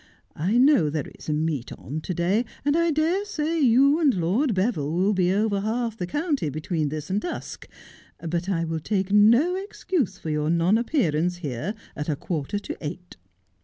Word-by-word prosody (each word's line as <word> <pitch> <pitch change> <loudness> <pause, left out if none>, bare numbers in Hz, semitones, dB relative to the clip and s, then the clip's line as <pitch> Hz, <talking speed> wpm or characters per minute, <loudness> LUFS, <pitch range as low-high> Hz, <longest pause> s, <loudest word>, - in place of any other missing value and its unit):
I 185 +10 +1
know 255 - +5
there 150 -2 -3
is - - -10
a - - +1
meet 150 -5 -2
on 150 +5 -6
to 180 - -4
day, 185 +7 +1 0.2
and 290 +1 +3
I 335 0 +3
dare 325 +6 +1
say 330 -5 -2
you 275 +4 +5
and 300 -5 +4
Lord 200 - +1
Beville 185 -7 0
will 185 +5 +2
be 185 -2 +2
over 205 0 +1
half 225 +1 -1
the 180 -5 -4
county 295 - -1
between 155 +1 -2
this 155 +3 -5
and 200 +2 +1
dusk, 350 - -6 0.5
but 170 +2 -3
I 170 -4 0
will 165 0 -2
take 195 +3 -1
no 235 - +5
excuse 365 - -2
for 160 - -5
your 150 0 0
non 170 +6 +3
appearance 180 - +1
here 145 - -3 0.2
at 150 +2 -4
a 150 - +1
quarter 155 +4 -3
to 205 - -5
eight.' 175 +4 -7
190 Hz, 190 wpm, -25 LUFS, 160-260 Hz, 0.5 s, know